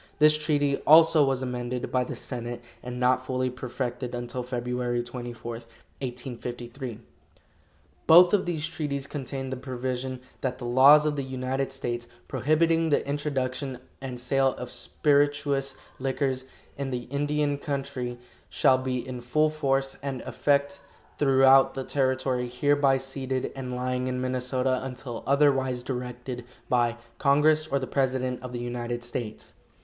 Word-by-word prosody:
This 150 0 +6
treaty, 145 -2 +1
also, 160 0 +8
was 135 -1 +1
amended 125 -1 -3
by 130 -1 +2
the - - -6
senate, 120 -1 -5 0.2
and 125 0 -6
not 125 +1 +3
fully 130 0 -1
perfected 125 -1 -4
until 120 +1 -4
Feb. 125 -1 -2
24, 120 -1 -6
1853. 120 +1 -7 1.1
Both 175 +3 +8
of 195 -3 +2
these 160 -3 -1
treaties 145 -4 -3
contained 135 -2 -5
the - - -4
provision 130 0 -4 0.2
that 130 -1 -2
"The 125 - -7
laws 135 +5 +7
of 150 -1 0
the 140 - -1
United 130 +1 -2
States, 120 -3 -4 0.2
prohibiting 165 +2 +2
the 145 - +1
introduction 140 -2 -2 0.2
and 130 -2 -5
sale 135 +1 +2
of 125 -1 -6
spirituous 145 -2 +1 0.2
liquors 130 0 -1 0.3
in 140 -1 -2
the 125 -2 -3
Indian 145 0 0
country, 135 -4 -3 0.3
shall 130 -1 +4
be 130 -1 -3
in 125 -1 -5
full 150 +6 +2
force 135 -3 0
and 135 -3 -4
effect 140 0 0 0.4
throughout 135 -1 +6
the 135 - -3
territory 130 -2 0
hereby 140 +2 +3
ceded 130 -1 -3
and 130 -2 -5
lying 125 0 -1
in 125 0 -2
Minnesota 130 0 0
until 125 -2 -6
otherwise 135 -3 +3
directed 125 -1 -5 0.3
by 120 -1 +2 0.2
congress 150 +2 +4
or 140 - +1
the 135 - -2
president 130 -2 -1
of 125 -1 -7
the 125 - -4
United 120 0 -4
States." 120 -2 -6
130 Hz, 140 wpm, -27 LUFS, 125-140 Hz, 1.1 s, also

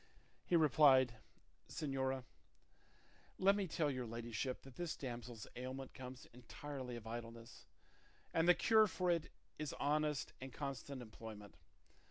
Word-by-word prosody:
He 175 - +2
replied, 135 -6 +6 0.5
"Señora, 135 -2 -1 1.1
let 195 +1 +5
me 200 -2 0
tell 155 -2 +1
your 130 -2 -3
ladyship 120 +2 -3
that 135 - -11
this 175 -2 -2
damsel's 120 -4 -6
ailment 130 +1 -5
comes 130 -1 -8
entirely 125 +1 -6
of 115 -2 -8
idleness, 115 +1 -7 0.7
and 165 +1 +3
the 175 - +8
cure 220 -1 +6
for 180 -2 +1
it 170 -2 0 0.3
is 150 -2 -2
honest 150 0 0
and 130 0 -6
constant 140 -1 -4
employment. 110 -2 -9
130 Hz, 130 wpm, -39 LUFS, 120-150 Hz, 1.1 s, the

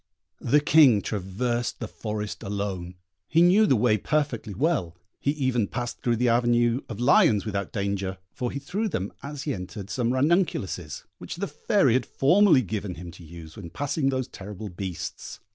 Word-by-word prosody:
The 145 +5 +3
King 145 -9 +6
traversed 115 +5 -2
the - - -4
forest 105 -2 -5
alone; 95 -3 -4 0.3
he 165 +2 +4
knew 200 +5 +5
the 130 - +4
way 110 -2 +3
perfectly 130 -7 -1
well; 100 - 0 0.2
he - - -1
even 130 -7 +1
passed 120 +3 -5
through 120 -1 +1
the 125 +2 +1
avenue 120 +1 +3
of 110 -2 -6
lions 120 -5 +4
without 100 -3 -3
danger, 100 -2 -2 0.2
for 125 - -3
he 140 - -5
threw 200 +10 -2
them, 100 - -3
as 140 0 -6
he 145 - -1
entered, 100 +1 -7
some 120 -2 0
ranunculuses, 130 - 0 0.2
which - - -7
the 190 +4 -2
Fairy 195 - +2
had 125 -1 +1
formerly 170 -1 +4
given 100 -3 -4
him 85 0 -8
to 85 +1 -14
use 80 -1 -11
when 85 -5 -8
passing 145 - -1
those 130 -1 -1
terrible 105 -2 -8
beasts. 90 -1 -6
120 Hz, 175 wpm, -26 LUFS, 100-140 Hz, 0.3 s, King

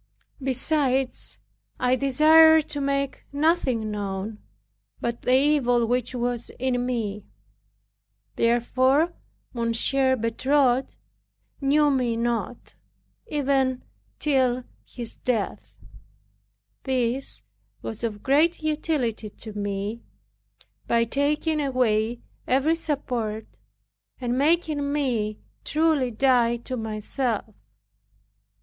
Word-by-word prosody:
Besides, 265 0 0 0.4
I 250 0 +3
desired 310 +4 +6
to 290 - -3
make 275 0 -1
nothing 280 -7 +1
known, 205 +1 -4 0.6
but 235 0 -3
the 250 - +3
evil 260 -4 +3
which 245 +1 -1
was 240 -1 -2
in 250 -1 0
me. 210 -5 -3 1.1
Therefore 260 +7 +2 0.4
Monsieur 255 +3 +1
Bertot 255 +3 +1 0.7
knew 290 +2 +3
me 245 -4 0
not, 235 0 -3 0.5
even 270 - 0 0.3
till 255 -4 +1 0.2
his 235 -2 -8
death. 110 - -3 1.1
This 255 0 -2 0.4
was 225 +1 -5
of 210 -3 -3
great 310 +5 +3
utility 295 -8 -1
to 215 +1 -9
me, 205 +2 -3 0.9
by 235 0 +3
taking 295 +5 0
away 240 -4 +1 0.3
every 275 +5 +3
support, 250 -9 -2 0.7
and 245 -2 -1
making 295 0 +1
me 235 -8 -1 0.3
truly 305 -4 +2
die 240 0 +3
to 255 +2 -6
myself. 220 0 -3
255 Hz, 90 wpm, -25 LUFS, 230-280 Hz, 1.1 s, desired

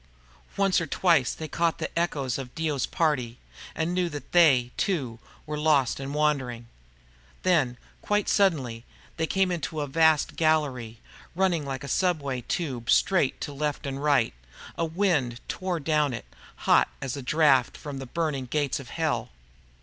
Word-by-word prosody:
Once 195 -3 +3
or 170 - -3
twice 165 -4 +3
they 160 - -6
caught 165 +1 0
the 160 - -5
echoes 140 -7 -1
of 125 -2 -8
Dio's 155 -4 -1
party, 130 -8 0 0.4
and 165 +2 -1
knew 180 -1 +1
that 145 -2 -8
they, 135 -8 +5
too, 130 - -1 0.3
were 150 -1 -4
lost 145 -5 +2
and 135 +1 -5
wandering. 135 -6 0 0.8
Then, 145 -10 +2 0.2
quite 210 -1 0
suddenly, 135 - +1 0.3
they 160 - 0
came 190 +1 +1
out 175 -2 -2
into 145 +4 -4
a 145 - -1
vast 160 +1 +3
gallery, 140 -8 0 0.4
running 175 -5 +1
like 135 0 -4
a - - -6
subway 140 -5 0
tube 125 -5 -3
straight 170 0 +3
to 145 - -4
left 150 0 -3
and 135 0 -4
right. 140 - +3 0.4
A 165 - 0
wind 160 -9 0
tore 185 -2 -2
down 150 -3 +1
it, - - -8 0.3
hot - - +3
as 135 -1 -4
a 140 - -5
draught 135 -2 +3
from 145 -2 -7
the 135 - -7
burning 150 -3 -2
gates 145 0 -1
of 130 -3 -10
Hell. 125 -8 -1
150 Hz, 165 wpm, -26 LUFS, 130-165 Hz, 0.8 s, they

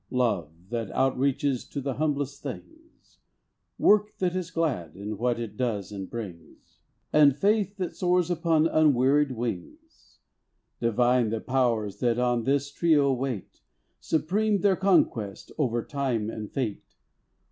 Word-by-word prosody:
Love, 115 - 0 0.2
that 115 -4 -2
outreaches 135 0 +1
to 145 - -4
the 135 0 -2
humblest 145 -1 -2
things; 320 - -11 0.6
Work 210 0 +3
that 180 -1 -1
is 185 -3 -3
glad, 125 - -2
in 105 +2 -5
what 120 +3 0
it 110 -3 -5
does 105 -5 -2
and 95 -2 -6
brings; 100 -8 -9 0.3
And 145 -3 +6
faith 200 +4 +1
that 180 -3 -4
soars 180 -1 +1
upon 165 -2 +2
unwearied 145 -3 +3
wings. 120 - -7 0.6
Divine 120 0 +2
the 110 +1 -2
Powers 120 -6 0
that 120 -2 +1
on 120 -2 +1
this 140 +1 +1
trio 145 -4 +3
wait. 125 -6 -4 0.4
Supreme 200 +6 0
their 195 -1 +4
conquest, 170 - +1
over 120 -5 0
Time 125 -7 -2
and 105 -1 -7
Fate. 120 -7 -4
135 Hz, 135 wpm, -27 LUFS, 115-160 Hz, 0.6 s, And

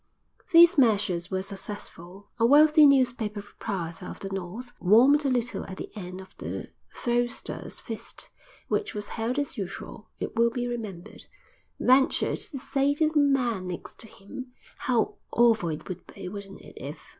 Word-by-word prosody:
These 340 0 +8
measures 200 -7 +2
were 190 -1 -1
successful. 195 -1 -7
A - - +2
wealthy 300 +2 +7
newspaper 245 -6 +2
proprietor 190 -5 -5
of - - -8
the 195 - -5
North, 195 +7 -6
warmed 255 +10 +6
a - - +3
little 245 -1 -1
at 190 - -8
the - - -7
end 185 -2 -7
of 190 0 -13
the - - -5 0.2
Throwsters' 240 0 -2
Feast 225 -3 -7 0.4
(which 410 - -1
was 205 0 -4
held 230 +3 -2
as 285 -6 -2
usual, 190 -2 -7
it - - -5
will 235 +1 +4
be 245 +1 -3
remembered), 215 -8 -6 0.5
ventured 265 +2 +3
to 285 - -7
say 275 +2 0
to 310 +1 +2
the 310 -1 +2
man 250 -9 +2
next 180 -1 -7
to 225 - -8
him: 215 +6 -9 0.3
"How 240 -4 0 0.2
awful 225 -7 +4
it 155 -1 -5
would 185 -1 -7
be, - - -9
wouldn't 200 0 -9
it, - - -14
if...." - - -8
225 Hz, 165 wpm, -27 LUFS, 195-260 Hz, 0.5 s, These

